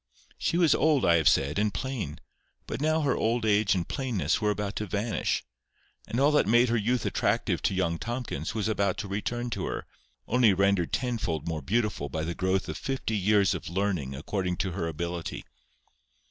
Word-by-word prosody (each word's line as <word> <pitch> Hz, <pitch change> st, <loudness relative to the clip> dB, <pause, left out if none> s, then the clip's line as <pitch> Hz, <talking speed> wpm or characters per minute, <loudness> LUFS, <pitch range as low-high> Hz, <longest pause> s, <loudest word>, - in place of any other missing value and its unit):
She 170 Hz, -, 0 dB
was 170 Hz, -5 st, +5 dB
old, 150 Hz, -2 st, +3 dB
I 85 Hz, -1 st, +5 dB
have 80 Hz, -5 st, +5 dB
said, 70 Hz, +7 st, +1 dB
and 105 Hz, 0 st, +2 dB
plain; 125 Hz, -, -4 dB, 0.5 s
but -, -, -5 dB
now 155 Hz, +1 st, +2 dB
her 140 Hz, -4 st, +1 dB
old 115 Hz, +1 st, 0 dB
age 105 Hz, -1 st, +3 dB
and 90 Hz, -2 st, -2 dB
plainness 125 Hz, -6 st, -1 dB
were 105 Hz, -, +2 dB
about 105 Hz, -1 st, -2 dB
to 105 Hz, -, -3 dB
vanish, 105 Hz, +3 st, -1 dB, 0.6 s
and 120 Hz, -, -2 dB
all 140 Hz, +2 st, +5 dB
that 150 Hz, -, +3 dB
had -, -, +2 dB
made 120 Hz, +1 st, +5 dB
her 120 Hz, -, +2 dB
youth 120 Hz, +3 st, 0 dB
attractive -, -, 0 dB
to -, -, 0 dB
young 85 Hz, -3 st, 0 dB
Tomkins 120 Hz, -, -4 dB
was 110 Hz, -2 st, 0 dB
about 100 Hz, -3 st, 0 dB
to 115 Hz, -3 st, -4 dB
return 120 Hz, +5 st, -3 dB
to -, -, -2 dB
her, -, -, -4 dB, 0.4 s
only 115 Hz, -5 st, +4 dB
rendered 100 Hz, -2 st, +2 dB
tenfold 105 Hz, -, -2 dB
more 80 Hz, -2 st, -2 dB
beautiful 105 Hz, -, -1 dB
by 80 Hz, +3 st, -3 dB
the 85 Hz, +2 st, -2 dB
growth 95 Hz, +2 st, 0 dB
of -, -, -5 dB
fifty 135 Hz, -5 st, -2 dB
years 100 Hz, -2 st, +3 dB
of -, -, -5 dB
learning 85 Hz, -8 st, -1 dB
according 90 Hz, +5 st, -2 dB
to 95 Hz, -, -1 dB
her 85 Hz, -2 st, -2 dB
ability. 85 Hz, +1 st, -4 dB
100 Hz, 195 wpm, -28 LUFS, 85-120 Hz, 0.6 s, was